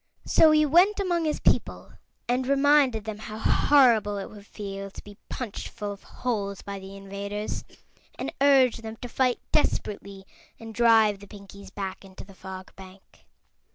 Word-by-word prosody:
So 320 Hz, -, +5 dB
he 305 Hz, 0 st, +4 dB
went 360 Hz, +8 st, +4 dB
among 350 Hz, -4 st, 0 dB
his 305 Hz, -, -1 dB
people -, -, 0 dB, 0.3 s
and 250 Hz, +1 st, 0 dB
reminded 275 Hz, -4 st, +3 dB
them 215 Hz, -1 st, -6 dB
how 215 Hz, 0 st, -8 dB
horrible 225 Hz, -4 st, +4 dB
it 195 Hz, -, -6 dB
would 205 Hz, -1 st, -13 dB
feel 195 Hz, -1 st, -7 dB
to -, -, -12 dB
be 205 Hz, 0 st, -14 dB
punched 240 Hz, -6 st, -5 dB
full 205 Hz, -1 st, -6 dB
of 200 Hz, -, -10 dB
holes 200 Hz, -5 st, -4 dB
by 200 Hz, -1 st, -6 dB
the 195 Hz, +1 st, -10 dB
invaders, 200 Hz, +1 st, -5 dB, 0.5 s
and -, -, -4 dB
urged 265 Hz, -5 st, +4 dB
them 220 Hz, 0 st, -7 dB
to 245 Hz, -, -8 dB
fight 250 Hz, 0 st, 0 dB
desperately 200 Hz, -1 st, -1 dB, 0.3 s
and 225 Hz, -1 st, -9 dB
drive 220 Hz, -3 st, +4 dB
the 200 Hz, -, -13 dB
Pinkies 200 Hz, -1 st, -12 dB
back 190 Hz, -1 st, -6 dB
into 190 Hz, -1 st, -12 dB
the 195 Hz, -, -15 dB
Fog 190 Hz, 0 st, -10 dB
Bank. 190 Hz, 0 st, -16 dB
210 Hz, 165 wpm, -26 LUFS, 200-255 Hz, 0.5 s, So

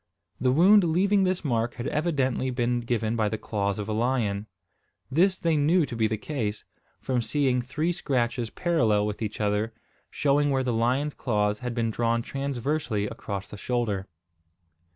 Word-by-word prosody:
The 125 Hz, 0 st, +2 dB
wound 190 Hz, +8 st, +6 dB
leaving 190 Hz, +4 st, +3 dB
this 185 Hz, -2 st, -1 dB
mark 120 Hz, -3 st, 0 dB
had 120 Hz, -, -5 dB
evidently 140 Hz, -5 st, 0 dB
been 120 Hz, -1 st, 0 dB
given 115 Hz, -1 st, -1 dB
by 110 Hz, -2 st, +1 dB
the 110 Hz, -, -2 dB
claws 100 Hz, -2 st, -2 dB
of 105 Hz, -1 st, -4 dB
a 110 Hz, -, -2 dB
lion. 110 Hz, -3 st, 0 dB, 0.6 s
This 185 Hz, +6 st, +3 dB
they 165 Hz, -3 st, +1 dB
knew 155 Hz, +3 st, +3 dB
to 120 Hz, -, -7 dB
be 110 Hz, -1 st, +2 dB
the 110 Hz, 0 st, -2 dB
case, 110 Hz, -4 st, -3 dB, 0.3 s
from 125 Hz, -2 st, -1 dB
seeing 130 Hz, 0 st, +1 dB
three 150 Hz, +7 st, -1 dB
scratches 120 Hz, -7 st, -1 dB
parallel 115 Hz, -13 st, +1 dB
with 105 Hz, +1 st, -4 dB
each 105 Hz, -1 st, -4 dB
other, 105 Hz, +2 st, 0 dB, 0.3 s
showing 145 Hz, +1 st, +2 dB
where 135 Hz, -1 st, +1 dB
the 125 Hz, -2 st, 0 dB
lion's 130 Hz, +6 st, +1 dB
claws 105 Hz, -3 st, 0 dB
had 125 Hz, -1 st, -4 dB
been 115 Hz, -1 st, 0 dB
drawn 115 Hz, +1 st, 0 dB
transversely 135 Hz, -5 st, -2 dB
across 100 Hz, -1 st, -5 dB
the 105 Hz, -, -9 dB
shoulder. 105 Hz, -4 st, -1 dB
120 Hz, 170 wpm, -26 LUFS, 110-145 Hz, 0.6 s, wound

